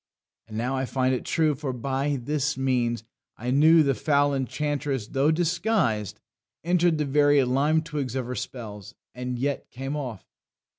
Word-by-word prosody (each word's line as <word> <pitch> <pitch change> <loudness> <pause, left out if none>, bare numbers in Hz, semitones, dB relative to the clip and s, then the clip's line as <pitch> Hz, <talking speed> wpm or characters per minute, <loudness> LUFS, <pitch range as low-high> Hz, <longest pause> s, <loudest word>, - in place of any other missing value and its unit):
And 110 -1 -7
now 125 +4 -1
I 130 0 -1
find 130 0 +1
it 125 - -3
true; 155 -2 +2
for 140 -1 -4
by 135 +3 -1
this 150 +2 -1
means 125 -3 0 0.3
I 125 +3 -3
knew 155 +4 +6
the 140 -1 +2
foul 145 +1 +2
enchantress, 140 -2 -2
though 135 +3 +2
disguised, 165 - 0 0.4
Enter'd 175 -1 +2
the 150 - 0
very 145 0 +4
lime 145 +5 +2
twigs 145 -6 -4
of 130 -2 -1
her 125 - -4
spells, 110 -5 -7 0.2
And 125 0 -4
yet 140 +3 -2
came 135 +3 -5
off. 125 -9 -5
135 Hz, 160 wpm, -26 LUFS, 125-150 Hz, 0.4 s, knew